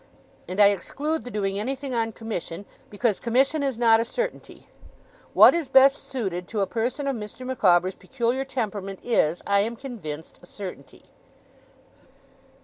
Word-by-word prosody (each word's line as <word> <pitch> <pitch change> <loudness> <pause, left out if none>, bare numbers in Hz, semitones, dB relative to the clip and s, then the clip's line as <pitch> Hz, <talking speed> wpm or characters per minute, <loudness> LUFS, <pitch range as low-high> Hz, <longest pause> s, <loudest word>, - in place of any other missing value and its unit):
And 185 +3 -5
I 205 -1 +8
exclude 295 - -3
the - - -5
doing 200 -3 -2
anything 265 +4 -4
on 225 -1 0
commission, 205 -4 -6 0.2
because 210 0 0
commission 270 +6 +2
is 270 -4 -1
not 225 -1 +5
a - - +2
certainty. - - -5 0.7
What - - +9
is 335 -4 -1
best 270 +1 +6
suited 190 -9 -4
to 215 -3 -2
a - - +3
person 240 +8 -2
of 275 - 0
Mr. 220 +3 -8
Micawber's 185 -8 +3
peculiar 255 +3 -2
temperament 210 -7 -4
is, 175 -8 +1
I 200 0 +3
am 225 +4 -1
convinced, 200 - -8
a 175 - -16
certainty. 180 -10 -9
225 Hz, 150 wpm, -25 LUFS, 195-265 Hz, 0.7 s, What